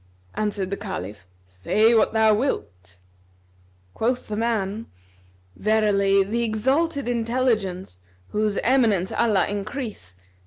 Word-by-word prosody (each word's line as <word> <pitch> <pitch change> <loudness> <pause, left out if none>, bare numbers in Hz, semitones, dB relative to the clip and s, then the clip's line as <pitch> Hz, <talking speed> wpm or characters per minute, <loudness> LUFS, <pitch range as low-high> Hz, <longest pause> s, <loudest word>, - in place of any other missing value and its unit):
Answered 205 -3 -2
the 200 - -2
Caliph, 105 - -7 0.2
"Say 150 - +2
what 225 - +3
thou 220 -1 +4
wilt." 95 - -3 1.0
Quoth 245 +3 -1
the 210 - -3
man 220 -1 -2 0.7
"Verily 200 -2 +2
the 225 +5 -2
Exalted 270 +7 0
Intelligence 225 - -1 0.3
(whose 210 -1 -1
eminence 225 -8 +2
Allah 210 -5 +2
increase!) 205 - -5
215 Hz, 105 wpm, -23 LUFS, 195-230 Hz, 1.0 s, thou